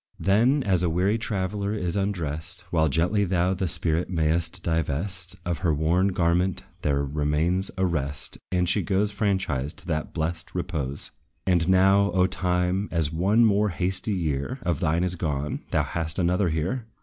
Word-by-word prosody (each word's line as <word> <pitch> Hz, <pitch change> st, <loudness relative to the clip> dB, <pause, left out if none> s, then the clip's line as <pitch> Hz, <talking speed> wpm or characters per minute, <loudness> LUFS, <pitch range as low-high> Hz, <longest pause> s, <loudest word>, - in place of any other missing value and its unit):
Then, 120 Hz, +9 st, +3 dB
as 95 Hz, -5 st, +2 dB
a 90 Hz, -, +1 dB
weary 95 Hz, +7 st, +1 dB
traveller 100 Hz, -1 st, -2 dB
is 90 Hz, -5 st, -2 dB
undressed, 85 Hz, -7 st, -2 dB
While 80 Hz, -2 st, +3 dB
gently 90 Hz, +8 st, +2 dB
thou 90 Hz, -1 st, +1 dB
the 95 Hz, 0 st, -2 dB
spirit 85 Hz, +1 st, 0 dB
may'st 85 Hz, +1 st, 0 dB
divest 85 Hz, +3 st, -1 dB
Of 85 Hz, -2 st, -2 dB
her 85 Hz, -5 st, +1 dB
worn 85 Hz, +6 st, +2 dB
garment, 90 Hz, 0 st, +1 dB, 0.2 s
there 70 Hz, -1 st, +1 dB
remains 75 Hz, +6 st, 0 dB
a 95 Hz, -, +2 dB
rest, 75 Hz, -6 st, -2 dB
And 90 Hz, -1 st, +1 dB
she 100 Hz, -, +2 dB
goes 95 Hz, +4 st, 0 dB
franchised 95 Hz, -, -1 dB
to -, -, -7 dB
that 80 Hz, -2 st, -2 dB
blest 80 Hz, 0 st, -3 dB
repose. 75 Hz, -6 st, -3 dB, 0.3 s
And 90 Hz, -2 st, +2 dB
now, 95 Hz, +2 st, +4 dB
O 90 Hz, -1 st, +4 dB
Time, 90 Hz, +1 st, 0 dB
as 80 Hz, -2 st, +1 dB
one 100 Hz, +8 st, +3 dB
more 105 Hz, 0 st, +3 dB
hasty 95 Hz, +3 st, -1 dB
year 80 Hz, -, -2 dB
Of 85 Hz, -, 0 dB
thine 85 Hz, 0 st, +1 dB
is 90 Hz, -1 st, 0 dB
gone, 75 Hz, -4 st, -2 dB
thou -, -, +1 dB
hast 80 Hz, -2 st, -3 dB
another 90 Hz, +1 st, +2 dB
here! 90 Hz, +10 st, -2 dB
90 Hz, 165 wpm, -25 LUFS, 80-95 Hz, 0.3 s, now